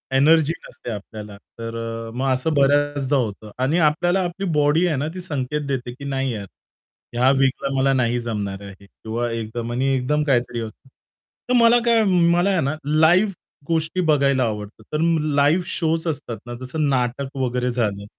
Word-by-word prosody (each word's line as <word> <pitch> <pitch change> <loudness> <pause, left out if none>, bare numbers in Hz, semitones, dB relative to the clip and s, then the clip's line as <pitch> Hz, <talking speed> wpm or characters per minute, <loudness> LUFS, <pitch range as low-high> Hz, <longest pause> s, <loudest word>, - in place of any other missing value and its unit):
Energy 160 +3 +4
नसते 120 - -8
आपल्याला, 105 0 -8 0.2
तर 115 0 -5
अ, 115 0 -5
मग 135 +1 0
असं 140 +5 -1
बऱ्याचदा 145 0 +2
होतं 110 -3 -3
आणि 155 +6 +2
आपल्याला 175 +4 0
आपली 180 +3 -4
बॉडी 150 +4 +3
आहे 155 - 0
ना, 145 +3 -1
ती 185 - -6
संकेत 150 -3 -3
देते, 125 -3 -3
की 140 +2 -10
नाही 135 -2 -1
यार 100 -2 -6 0.7
ह्या 125 +2 +3
वीकला 135 0 +1
मला 135 +1 +3
नाही 120 -1 +1
जमणार 100 -4 -4
आहे 100 0 -12
किंवा 115 +4 -4
एकदम 115 +1 -4
आणि 130 +3 0
एकदम 150 +4 0
काहीतरी 125 -4 0
होतं. 115 +4 -8 0.6
तर - - +2
मला 235 0 +6
काय 230 -2 +4
मला 175 0 +3
आहे 185 -4 +2
ना, 140 +3 -1
लाईव्ह 165 +7 +4 0.4
गोष्टी 165 +2 0
बघायला 140 -4 +3
आवडतात, 105 -1 -5
तर 150 - 0 0.4
लाईव्ह 150 +5 +3
शोज 165 -1 -1
असतात 145 -7 -4
ना, 120 - -7
जसं 145 +3 -1
नाटक 135 +2 -1
वगैरे 125 -1 -1
झालं. 105 -4 -2
135 Hz, 170 wpm, -22 LUFS, 120-155 Hz, 0.7 s, मला